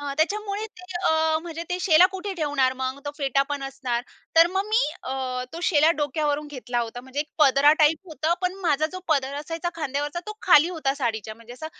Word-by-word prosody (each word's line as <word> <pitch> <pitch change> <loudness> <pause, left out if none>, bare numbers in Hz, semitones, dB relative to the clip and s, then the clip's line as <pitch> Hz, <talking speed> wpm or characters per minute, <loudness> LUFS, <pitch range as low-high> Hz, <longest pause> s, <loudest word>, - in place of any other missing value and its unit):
हां, 285 -1 -4
त्याच्यामुळे 410 +5 -1
ते 365 -4 -15 0.2
अ, 320 -1 +2
म्हणजे 335 -1 -6
ते 360 - -1
शेला 355 -1 +6
कुठे 390 +1 -5
ठेवणार 290 -6 +1
मग. 260 +1 -2
तो 290 - -3
फेटा 275 -1 +2
पण 285 -1 -3
असणार. 260 -3 -3 0.3
तर 330 +1 +8
मग 390 - 0
मी 445 +3 +3 0.2
अ, 255 -1 -3
तो 335 - -6
शेला 310 -1 +5
डोक्यावरून 295 0 -1
घेतला 250 -4 -3
होता. 235 +1 -5
म्हणजे 265 +3 -4
एक 300 - -5
पदरा 280 0 +6
टाइप 320 +5 +1
होतं 315 +2 0
पण 365 0 0
माझा 310 0 +2
जो 370 - -6
पदर 280 -3 +1
असायचा 330 +3 -4
खांद्यावरचा 290 +1 -3
तो 425 0 -7
खाली 310 +4 +6
होता 305 -6 -1
साडीच्या 220 -5 -3
म्हणजे 230 +1 -13
असा 255 +6 -7
295 Hz, 205 wpm, -24 LUFS, 270-335 Hz, 0.3 s, तर